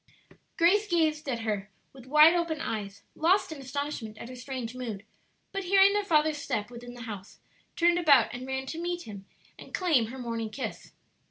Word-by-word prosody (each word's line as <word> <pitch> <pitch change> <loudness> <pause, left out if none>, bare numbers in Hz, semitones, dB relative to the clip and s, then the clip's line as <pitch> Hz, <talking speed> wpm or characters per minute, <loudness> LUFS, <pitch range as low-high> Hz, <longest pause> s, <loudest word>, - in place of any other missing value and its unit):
Grace 400 +5 +4
gazed 315 -5 +1
at 235 -3 -2
her 210 -2 -2 0.2
with 260 -2 -14
wide 305 +4 +7
open 335 -3 -1
eyes, 200 -5 -4
lost 370 +3 +2
in 305 -3 -7
astonishment 265 -5 -4
at 235 - -8
her 255 - -8
strange 250 -2 -5
mood; 225 -5 -6 0.5
but 390 -1 -4
hearing 390 +2 +6
their 415 0 +1
father's 310 -4 +2
step 215 -5 -3
within 245 0 -9
the 245 - -10
house, 205 -4 -8 0.4
turned 345 +1 +3
about 280 -9 +5
and 250 +2 -6
ran 265 0 -3
to 320 +5 -5
meet 350 0 -3
him 200 -3 -10 0.3
and - - -7
claim 310 -11 +2
her 255 +4 -8
morning 230 -3 -3
kiss. 255 +5 -6
265 Hz, 185 wpm, -28 LUFS, 230-335 Hz, 0.5 s, wide